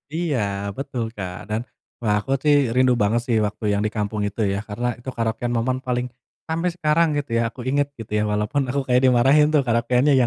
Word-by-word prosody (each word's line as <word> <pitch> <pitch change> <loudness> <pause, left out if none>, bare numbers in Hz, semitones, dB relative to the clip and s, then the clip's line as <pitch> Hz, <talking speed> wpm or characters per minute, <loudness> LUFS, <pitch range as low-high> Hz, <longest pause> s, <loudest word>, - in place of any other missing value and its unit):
Iya 165 -6 0 0.4
betul, 130 -3 -3
Kak. 90 -3 -5 0.2
Dan, 110 +2 -1 0.4
wah, 105 -3 +1
aku 135 +6 -6
sih 150 -1 +5 0.2
rindu 130 0 +4
banget 110 +3 +2
sih 115 -2 +2
waktu 105 +2 -5
yang 100 - 0
di 105 - -1
kampung 105 0 -2
itu 100 - -8
ya, - - -1
karena 120 +4 -2
itu 130 - -7
karaokean 115 +1 -1
momen 125 +3 0
paling 125 0 0 0.4
sampai 165 +2 0
sekarang 165 0 +2
gitu 145 -2 -3
ya - - +2
aku 125 - -18
inget 145 +1 +2
gitu 110 - -9
ya - - +1
walaupun 105 +7 0
aku 140 +3 0
kayak 125 0 +3
dimarahin 130 +4 +5
tuh 145 - +5
karaokeannya 125 +4 +3
125 Hz, 205 wpm, -22 LUFS, 110-140 Hz, 0.4 s, sih